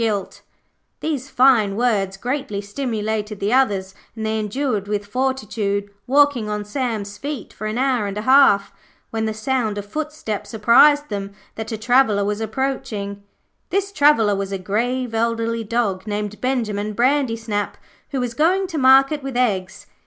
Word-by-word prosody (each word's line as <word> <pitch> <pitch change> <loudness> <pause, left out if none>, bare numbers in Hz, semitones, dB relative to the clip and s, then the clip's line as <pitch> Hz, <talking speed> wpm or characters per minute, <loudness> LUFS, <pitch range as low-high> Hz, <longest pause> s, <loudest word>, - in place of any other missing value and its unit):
These 285 -4 -3
fine 240 -7 +4
words 200 -5 0
greatly 250 -2 -3
stimulated 210 -1 -3
the 205 +4 0
others, 200 -8 +2 0.2
and 220 -1 -4
they 220 0 0
endured 215 -1 -2
with 205 0 -2
fortitude, 210 -4 -2 0.2
walking 275 -5 +3
on 210 0 -3
Sam's 210 -3 -3
feet 285 -5 -5
for 215 - -5
an 215 +2 -3
hour 255 -5 +1
and 200 +1 -5
a 210 - -3
half, 260 -6 +5 0.4
when 225 0 -1
the 220 - -1
sound 220 -2 -1
of 205 - -4
footsteps 290 -4 -5
apprised 290 +7 +5
them 200 -1 -4 0.2
that 220 +1 -6
a 220 - -2
traveller 225 -3 +3
was 210 +1 -2
approaching. 220 -4 -3 0.5
This 395 +2 -1
traveller 285 - +4
was 195 0 -3
a 195 - -1
grave, 235 +6 -2
elderly 230 0 0
dog 215 -3 -1
named 210 0 -4
Benjimen 215 -5 -1
Brandysnap, 230 -5 0 0.3
who 275 - -2
was 245 -2 -2
going 360 +8 +2
to 320 - -3
market 270 +3 +5
with 270 -2 -4
eggs. 190 -7 -1
225 Hz, 150 wpm, -21 LUFS, 205-265 Hz, 0.5 s, half